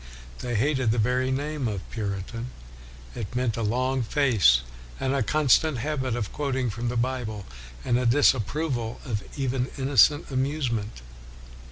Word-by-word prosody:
They 120 -1 -3
hated 130 +1 +1
the 115 - +1
very 125 +3 +1
name 145 0 -2
of 100 -4 -4
Puritan. 110 +2 -4 0.6
It 115 +1 -6
meant 125 -3 0
a 115 - -3
long 130 +4 0
face, 110 - +4 0.4
and 135 0 0
a 140 - +1
constant 150 +4 +3
habit 130 -1 -2
of 115 -4 -4
quoting 130 -5 -1
from 120 +3 -3
the 120 - -2
Bible, 120 -4 -2 0.4
and 120 - +2
a 125 - +1
dis 140 +4 +5
approval 125 -1 -3
of 110 -6 -2 0.2
even 130 -2 -1
innocent 145 +3 +4
amusement. 130 - -2
125 Hz, 150 wpm, -26 LUFS, 115-135 Hz, 0.6 s, dis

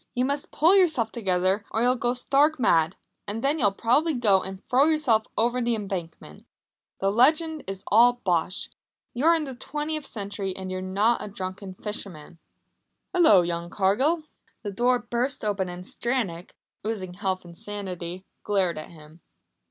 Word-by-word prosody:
You 250 +1 +1
must 280 +1 -2
pull 335 +6 +4
yourself 315 - +3
together 190 -2 0
or 225 - 0
you'll 250 +1 +4
go 245 0 -1
stark 285 +4 +2
mad, 165 -7 +3 0.3
and 220 +3 -4
then 290 +3 +1
you'll 205 -6 +3
probably 275 +10 +1
go 205 -6 +3
and 190 0 -8
throw 260 +3 +4
yourself 295 -9 +2
over 240 +3 +1
the 235 -1 +1
Embankment. 175 - -7 0.5
That 195 0 +2
legend 310 +7 +3
is 195 0 -5
all 235 +4 +6
bosh! 185 -6 -1 0.5
You're 315 +7 +4
in 320 - -1
the 270 -3 -6
twentieth 295 +3 -4
century, 200 -2 -4
and 190 -1 -6
you're 185 0 -3
not 200 +5 +1
a - - -5
drunken 190 -1 -6
fisherman 180 -6 -5 0.4
" - - -53
"Hullo, 215 - +6
young 170 0 -3
Cargill!" 255 - +1 0.4
The 205 - -3
door 245 +5 +2
burst 240 +2 -2
open 195 -3 -1
and 180 +1 -8
Stranack, 210 -10 -3 0.3
oozing 200 -4 -4
health 185 -1 -3
and 170 -1 -12
sanity, 185 -3 -6 0.2
glared 185 -6 0
at 155 - -9
him. 155 0 -15
210 Hz, 165 wpm, -26 LUFS, 185-250 Hz, 0.5 s, all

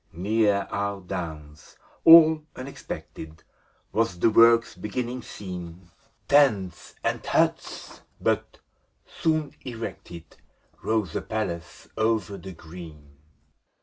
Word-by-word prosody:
Near 100 +2 +1
our 100 0 -2
downs, 80 -5 -7 0.3
all 160 -1 +9
unexpected, 80 - -8 0.5
Was 110 -5 0
the 110 +6 +3
work's 115 +1 +5
beginning 120 +6 -4
seen. 90 -4 -9 0.4
Tents 110 -12 +2
and - - -1
huts! - - -1
— - - -39
^but, - - +2 0.6
soon 155 -3 -1
erected. 110 -8 -8 0.4
Rose 110 -7 -1
a - - -1
palace 85 -7 -5
o'er 110 +1 +3
the 95 -1 -9
green. 80 -4 -12
100 Hz, 100 wpm, -25 LUFS, 85-115 Hz, 0.6 s, all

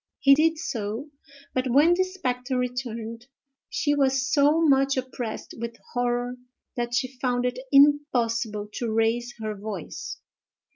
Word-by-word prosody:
He 275 - +6
did 320 +3 +3
so; 235 -1 -4 0.4
but, 255 0 0
when 295 +7 +5
the 370 +1 +3
spectre 260 -9 -3
returned, 240 -2 -4 0.4
she 315 -12 +1
was 270 -1 +2
so 295 +2 +4
much 275 -3 +3
oppressed 250 -3 -5
with 230 0 -5 0.2
horror 245 0 -1 0.4
that 240 0 -2
she 255 +1 -2
found 250 -1 0
it 250 0 -1
impossible 245 -7 +3
to 235 -2 -2
raise 230 +2 0
her 215 -1 -3
voice. 200 -4 -6
250 Hz, 135 wpm, -26 LUFS, 235-275 Hz, 0.4 s, He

